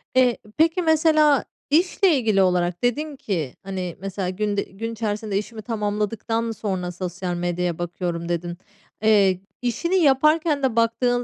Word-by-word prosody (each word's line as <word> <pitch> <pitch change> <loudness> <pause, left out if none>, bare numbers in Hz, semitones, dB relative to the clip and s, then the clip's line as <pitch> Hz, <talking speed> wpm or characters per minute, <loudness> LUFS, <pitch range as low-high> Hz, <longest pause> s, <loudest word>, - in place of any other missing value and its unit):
Eee, 250 -2 +4 0.2
peki 330 +3 +3
mesela 310 -3 +4 0.3
işle 350 +3 +3
ilgili 215 -6 +2
olarak 180 0 +1
dedin 295 +5 0
ki, 170 - -3
hani, 185 -3 -4
mesela, 195 -1 -3
"Günde 205 +1 -1
gün 225 +4 -6
içerisinde 210 -2 -2
işimi 215 +1 -5
tamamladıktan 225 +1 -2
sonra 190 -5 -3
sosyal 180 0 -4
medyaya 175 -1 -1
bakıyorum." 175 -1 -3
dedin. 175 0 -3 0.5
Eee, 200 -4 +4 0.2
işini 335 - -1
yaparken 305 -1 +3
de 255 -4 +1
baktığın 245 +1 +2
215 Hz, 135 wpm, -23 LUFS, 180-260 Hz, 0.5 s, Eee